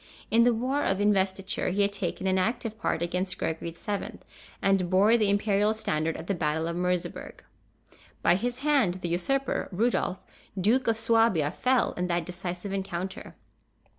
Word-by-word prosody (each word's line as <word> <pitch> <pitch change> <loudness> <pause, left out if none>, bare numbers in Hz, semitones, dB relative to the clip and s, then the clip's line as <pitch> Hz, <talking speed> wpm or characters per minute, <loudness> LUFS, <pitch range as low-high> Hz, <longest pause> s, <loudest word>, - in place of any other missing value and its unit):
In 230 +1 +5
the 245 - +5
war 260 +5 0
of 195 - 0
Investiture 195 0 +1
he 200 +3 +2
had 200 - +1
taken 200 -1 -3
an 190 0 +2
active 225 +2 -1
part 170 - -1
against 180 +2 -2
Gregory 160 +1 -3
VII., 200 +5 -5 0.4
and 195 -2 +2
bore 200 +5 +5
the 215 -3 +2
Imperial 205 +1 +2
standard 165 -7 -1
at 160 - -8
the 200 - -1
battle 160 -1 -1
of 170 - -3
Merseberg. 180 0 -3 0.8
By - - +5
his 245 +7 -2
hand 270 -12 +3
the 180 -2 -4
usurper, 270 +11 -1
Rudolph, 200 -1 0 0.3
Duke 235 +7 +2
of 225 -1 +2
Suabia, 225 -9 +3
fell 255 +3 +1
in 180 0 -2
that 170 -1 -1
decisive 180 +2 -5
encounter. 190 -1 -5
195 Hz, 165 wpm, -27 LUFS, 175-225 Hz, 0.8 s, In